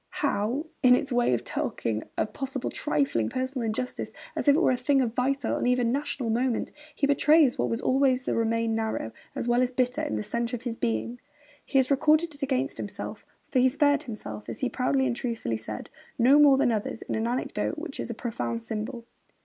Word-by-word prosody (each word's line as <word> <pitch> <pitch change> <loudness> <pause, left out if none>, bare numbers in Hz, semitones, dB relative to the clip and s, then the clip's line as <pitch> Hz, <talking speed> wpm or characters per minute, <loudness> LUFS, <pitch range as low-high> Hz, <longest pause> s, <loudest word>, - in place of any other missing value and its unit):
How, 240 +4 0 0.2
in 250 -3 +7
its 275 +2 -2
way 240 - +2
of - - -4
taking 110 -1 -2 0.2
a - - +2
possible 265 +3 -4
trifling 140 -7 0
personal 260 -1 -2
injustice 250 +4 -3 0.2
as - - -3
if 285 - +7
it - - +3
were 350 - +4
a - - +2
thing 270 +3 +2
of 240 -4 0
vital 270 +3 0
and - - 0
even 250 -2 +2
national 265 -3 -1
moment, 240 +1 0 0.2
he 285 - +1
betrays 285 -1 +4
what - - +1
was 230 +2 -2
always 260 -1 +2
to - - 0
remain 230 0 +1
narrow, 220 - -2 0.2
as - - -3
well 240 +1 +3
as 250 - +2
bitter, 250 0 0
in 110 - -2
the 105 - -2
centre 235 - -2
of 235 - -8
his 240 -2 -3
being! 115 - -2 0.4
He 275 - -1
has 265 +1 +3
recorded 310 +4 +3
it 285 - -11
against 270 0 -1
himself - - -6 0.2
(for 260 - +2
he 260 +1 +5
spared 285 +1 +3
himself, 110 - -7
as - - -6
he 255 - +1
proudly 265 +1 +1
and 245 -2 0
truthfully 230 - -2
said, 110 -1 -6 0.3
no 260 +5 +6
more 285 -2 +7
than 250 - +3
others) 220 0 -3
in - - -4
an 220 +1 0
anecdote 250 +6 -2
which 315 -2 -6
is - - -3
a 235 - -4
profound 120 - -3
symbol. 230 - -5
250 Hz, 215 wpm, -27 LUFS, 225-270 Hz, 0.4 s, in